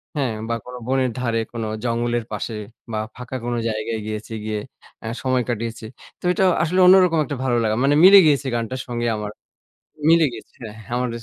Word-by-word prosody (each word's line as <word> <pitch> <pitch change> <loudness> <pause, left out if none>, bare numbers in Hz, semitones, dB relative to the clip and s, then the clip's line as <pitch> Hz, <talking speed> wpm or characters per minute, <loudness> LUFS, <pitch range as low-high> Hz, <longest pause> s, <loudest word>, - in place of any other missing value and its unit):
হ্যাঁ। 135 -6 0 0.2
বা 115 - +1
কোন 125 - -9
বনের 130 -1 +1
ধারে, 115 -2 0
কোন 115 - -4 0.2
জঙ্গলের 120 -1 -1
পাশে 115 - -4 0.4
বা 110 - -2 0.2
ফাঁকা 125 +1 -8
কোন 120 - -1
জায়গায় 110 0 -2
গিয়েছি, 110 +1 -5
গিয়ে 110 -1 -2 0.4
এ্যা 110 - -5
সময় 130 -1 +1
কাটিয়েছি। 115 -1 -4 0.3
তো - - -28
এটা 195 - +1 0.2
আসলে 180 +3 0
অন্যরকম 180 -3 +6
একটা 145 - -4
ভালো 125 -2 +1
লাগা। 110 -1 +1
মানে 145 +1 +3
মিলে 200 +2 +10
গিয়েছে 140 -3 +2
গানটার 120 +2 -3
সঙ্গে 120 -1 -2
আমার, 105 -1 -5 0.8
মিলে 165 -1 +6
গিয়েছে, 110 - -11
হ্যাঁ, 110 -2 -8
হ্যা, 120 - -7
আমার 125 0 -1
120 Hz, 185 wpm, -22 LUFS, 115-135 Hz, 0.8 s, মিলে